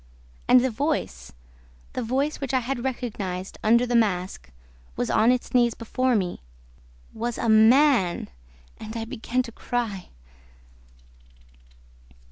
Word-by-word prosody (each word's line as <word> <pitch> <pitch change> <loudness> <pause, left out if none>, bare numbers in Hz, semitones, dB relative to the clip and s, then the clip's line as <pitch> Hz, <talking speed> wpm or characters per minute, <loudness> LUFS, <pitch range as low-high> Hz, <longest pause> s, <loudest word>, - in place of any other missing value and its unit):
And 250 0 +6
the 260 - 0
voice, 230 - -3 0.6
the 255 - -3
voice 270 +6 -1
which 270 -1 -2
I 255 - +2
had 245 0 -3
recognized 205 -8 -4
under 235 +3 +4
the 245 0 -1
mask, 185 - 0 0.5
was - - -2
on 225 +3 +4
its 250 -1 -2
knees 240 -2 +3
before 255 +2 0
me, 185 -4 -2 0.7
WAS 235 +1 -3
A - - -2
MAN! 220 -3 +4 0.5
And 220 +1 -7
I 225 - -4
began 235 +3 -2
to 235 - -9
cry... 225 -5 -4
235 Hz, 125 wpm, -25 LUFS, 215-255 Hz, 0.7 s, And